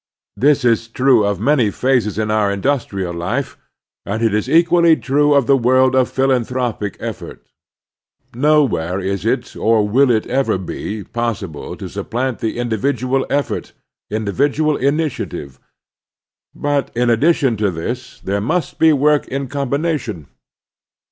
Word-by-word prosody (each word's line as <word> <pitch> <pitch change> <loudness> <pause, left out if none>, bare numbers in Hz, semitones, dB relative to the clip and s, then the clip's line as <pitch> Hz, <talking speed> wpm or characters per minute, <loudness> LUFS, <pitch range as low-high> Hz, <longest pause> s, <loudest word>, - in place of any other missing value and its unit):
This 140 0 +2
is 115 -1 +2
true 125 -1 +3
of 100 0 -1
many 135 -7 +2
phases 120 -3 0
in 110 -1 -1
our 105 -2 +2
industrial 100 -5 -2
life, 105 +11 -3 0.5
and 110 +3 -3
it 110 -2 +2
is 105 +4 -1
equally 170 +1 +5
true 145 0 +2
of 140 -3 +3
the 135 - +4
world 130 +1 +3
of 130 -2 +3
philanthropic 125 -5 -1
effort. - - -7 0.9
Nowhere 130 - +1
is 100 +2 -3
it, 125 +1 -1
or 110 -2 +2
will 130 +6 +3
it 110 -3 +2
ever 135 -5 0
be, 100 +3 -5
possible 110 -10 -4
to - - -7
supplant 125 +1 -4
individual 120 +3 -1
effort, 140 0 -2 0.4
indi 105 -1 -2
vidual 145 +4 +1
initiative; 140 - -2 1.0
but 145 -1 -1
in 120 0 +2
addition 140 0 +2
to 105 -1 +1
this 120 +9 -6
there 100 +1 -2
must 160 - -2
be 160 0 +6
work 150 0 +2
in 135 +1 -3
combination. 140 - -2
125 Hz, 135 wpm, -18 LUFS, 105-140 Hz, 1.0 s, be